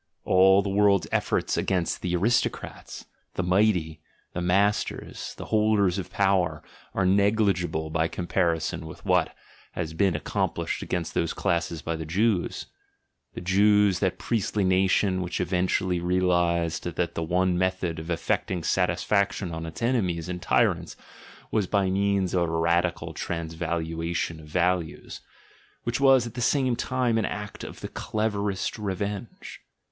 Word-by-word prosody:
All 95 +1 +5
the 100 - -2
world's 100 -1 +3
efforts - - 0
against 90 -3 0
the 90 -1 -1
"aristo 115 +7 +3
crats," - - -10 0.3
the 95 - -1
"mighty," 90 -4 +1 0.3
the 90 - -3
"masters," 100 +4 0
the - - -7
"holders 105 -3 +3
of 95 - -6
power," 90 -6 +1 0.3
are 95 - +1
negligible 95 -5 +2
by 80 0 +1
comparison 85 -2 -1
with 80 - -11
what - - +2 0.4
has 80 -2 -4
been 95 +1 +2
accomplished 75 - -2
against 85 -3 -3
those 85 - 0
classes 85 -4 -1
by 80 - -2
the 80 -1 -6
Jews 100 +2 0 0.4
— - - -51
the - - -5
Jews, 100 +1 +4
that 95 -3 0
priestly 105 -3 -1
nation 95 0 +2
which 90 -1 -3
eventually 90 0 0
realised 85 -2 +1
that 85 -1 -1
the - - -3
one 90 +2 +1
method 90 -2 -1
of 80 +2 -8
effecting 85 +1 -1
satisfaction 95 +2 +1
on 80 0 -5
its 80 +8 -7
enemies 95 -10 0
and 90 -1 -5
tyrants - - +1 0.6
was 105 -4 +1
by 100 -2 +1
means 100 -1 +1
of 90 - +2
a - - -3
radical 85 +2 0
transvaluation 85 0 -3
of 75 - -13
values, 90 0 -1 0.6
which 120 +1 -1
was 135 -3 +5
at 115 - -7
the 125 - -5
same 130 -1 +2
time 125 -2 0
an - - 0
act 105 0 -6
of - - -9
the - - -4
cleverest 105 -2 -2
revenge. 100 +2 -5
90 Hz, 145 wpm, -26 LUFS, 85-100 Hz, 0.6 s, All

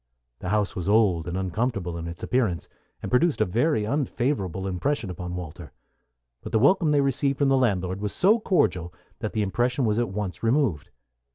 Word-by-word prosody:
The 90 - -5
house 105 0 0
was 90 +1 -3
old 100 -6 +3
and 90 +1 -3
uncomfortable 95 -1 -2
in 85 0 -5
its 85 0 -8
appearance, 115 -10 0 0.4
and - - -4
produced 145 +5 +3
a - - +3
very 115 - +1
unfavorable 120 - -1
impression 100 +3 -1
upon 90 0 -6
Walter; 90 -4 -8 0.7
but - - -8
the - - +3
welcome 155 - +4
they 145 -1 +3
received 140 0 +1
from 140 -1 +2
the 135 - +4
landlord 95 -7 0
was 105 -1 -2
so 215 +5 +4
cordial 95 - +1 0.3
that 110 - -4
the 110 - +1
impression 120 +6 0
was 105 +1 +1
at 120 - 0
once 100 -1 -4
removed. 115 - +1
105 Hz, 185 wpm, -25 LUFS, 90-135 Hz, 0.7 s, welcome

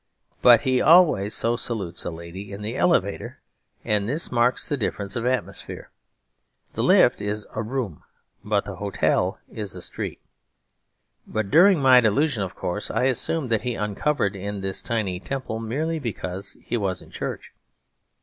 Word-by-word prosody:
But 120 -1 +7
he 130 -2 +1
always 155 - +5
so 115 +1 +1
salutes 100 -8 -2
a - - -1
lady 85 +4 -9
in 100 +1 -7
the 110 +4 -4
elevator; 100 - 0 0.5
and 105 0 +1
this 150 +5 -1
marks 120 +1 +2
the 145 - 0
difference 100 -5 -3
of 120 0 -1
atmosphere. 130 0 -3 0.8
The - - -2
lift - - +5
is 105 +1 -2
a 110 - -2
room, 115 - -4 0.4
but 105 -1 0
the 100 -3 -7
hotel 100 -1 0 0.2
is 105 -3 -5
a - - -8
street. - - -5 1.1
But 110 -2 -3
during 175 -1 +6
my 130 -1 +7
first - - +1
delusion, 135 +2 +2
of 95 -2 -4
course, 105 +4 -3
I - - 0
assumed 130 +1 0
that 110 - +2
he 125 -2 -2
uncovered 105 +1 -1
in 100 +1 -5
this 95 0 -1
tiny 105 -7 -2
temple 130 0 -4
merely 150 +9 -2
because 100 -6 -4
he 120 - -2
was 95 -4 -2
in - - -18
church. - - -6
110 Hz, 165 wpm, -24 LUFS, 100-130 Hz, 1.1 s, But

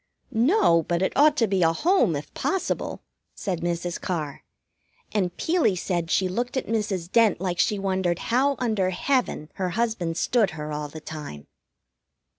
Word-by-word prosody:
"No, 235 - +4
but 175 +2 -1
it - - 0
ought 295 +1 +5
to 230 - +4
be 195 -2 +1
a 165 -1 +5
home, 305 - +2
if 145 - -6
possible," 385 -1 -2 0.3
said 185 -5 -3
Mrs. 175 0 -2
Carr, 155 -6 -3 0.7
and 185 -4 -1
Peelie 325 - +2
said 175 -2 -2
she 190 - +2
looked 240 +8 -2
at - - -1
Mrs. 205 -6 -2
Dent 225 -6 +4
like 180 -1 -2
she 205 +3 +2
wondered 190 -3 0 0.2
how 275 +3 +3
under 215 -7 0
heaven 185 - -1
her 185 -1 -1
husband 195 -6 -1
stood 230 -1 +2
her 150 0 -5
all 150 0 -3
the 155 +2 -10
time. 150 - -8
190 Hz, 165 wpm, -25 LUFS, 170-230 Hz, 0.7 s, ought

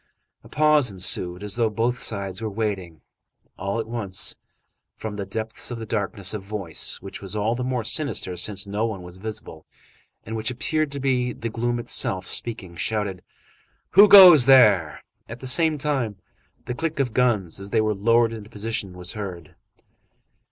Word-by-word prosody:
A - - -15
pause 150 -4 +3
ensued, 90 -1 -1
as 105 +1 -3
though 115 -2 +2
both 115 +2 -1
sides 100 -2 -2
were 110 - -2
waiting. 100 -7 -4 0.5
All 100 +4 -3
at 115 - -2
once, 110 -5 -3 0.6
from 110 -1 -6
the 100 -2 -5
depths 110 +2 -6
of 120 - -5
this 110 -1 -7
darkness, 100 -2 -2
a 105 - -3
voice, 100 -4 -4
which 95 - -8
was 100 +1 -4
all 105 +2 0
the 125 +1 -3
more 125 -2 -2
sinister, 125 - -1
since 100 +3 -1
no 100 +2 -2
one 100 -5 -6
was 90 +1 -11
visible, 110 +2 -8 0.6
and 110 - -6
which 110 +1 -2
appeared 155 +4 -1
to 140 - -4
be 125 -2 0
the 115 - -5
gloom 120 +2 -2
itself 95 -5 0
speaking, 95 -7 -3
shouted:— 100 -1 -2 0.7
"Who 200 +3 +8
goes 180 -10 +10
there?" 105 - +5 0.3
At 115 +2 -8
the - - -9
same 155 +4 +3
time, 135 -7 -1 0.5
the 125 - -3
click 160 +3 -3
of 125 -5 0
guns, 110 -10 +1
as 100 0 -6
they 110 - +1
were 110 0 +1
lowered 115 +3 +2
into 110 -2 -9
position, 105 -3 -3
was 90 +1 -2
heard. 95 -6 -7
110 Hz, 175 wpm, -23 LUFS, 100-125 Hz, 0.7 s, goes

